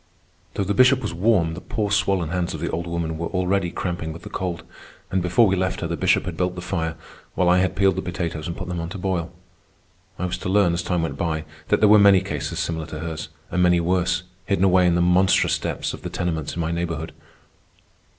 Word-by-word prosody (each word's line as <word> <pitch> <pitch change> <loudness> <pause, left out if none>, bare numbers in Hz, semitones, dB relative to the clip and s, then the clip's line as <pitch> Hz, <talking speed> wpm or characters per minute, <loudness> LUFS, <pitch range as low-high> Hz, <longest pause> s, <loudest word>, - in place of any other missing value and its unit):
Though 100 - 0
the 100 +2 -1
Bishop 130 +5 +5
was - - -3
warm, 85 -3 +2
the 90 - -7
poor 110 -5 -2
swollen 100 -5 +1
hands 90 -1 -2
of - - -6
the 85 - -3
old 85 +2 -3
woman 85 -1 -3
were 85 - -2
already 90 0 0
cramping 85 -3 -4
with 85 +2 -10
the - - -9
cold; 90 -2 -3 0.5
and 95 - +1
before 90 +6 +4
we 95 -2 +2
left 95 0 -1
her, 85 - -1
the 85 - -2
Bishop 95 +2 +2
had 90 -3 -4
built 90 +1 -1
the 90 - -6
fire, 80 -3 -2 0.4
while 90 - +2
I 90 +1 +5
had 95 0 0
peeled 95 -1 +3
the - - 0
potatoes 85 -4 -4
and 85 - -5
put 90 - -6
them 90 -1 -3
on 85 0 -4
to 95 - -6
boil. 90 -3 -2 0.9
I 90 - -2
was 90 0 -3
to 95 - -4
learn, 95 -3 +3
as 85 - -1
time 90 -1 -1
went 70 -4 -3
by, 80 -1 -2 0.2
that - - +2
there 105 - +6
were 105 +1 +7
many 100 -2 +6
cases 80 -7 -4
similar 80 -2 -2
to 75 0 -7
hers, 80 -1 -5 0.2
and 90 - +1
many 90 -1 +4
worse, 90 +1 +1 0.2
hidden 95 -1 +2
away 90 -1 +5
in 85 - +3
the 85 - +2
monstrous 90 +2 +3
depths - - -3
of - - -8
the - - -5
tenements 80 -4 -3
in 85 - -2
my 80 0 -1
neighborhood. 85 -1 -3
90 Hz, 240 wpm, -23 LUFS, 85-95 Hz, 0.9 s, were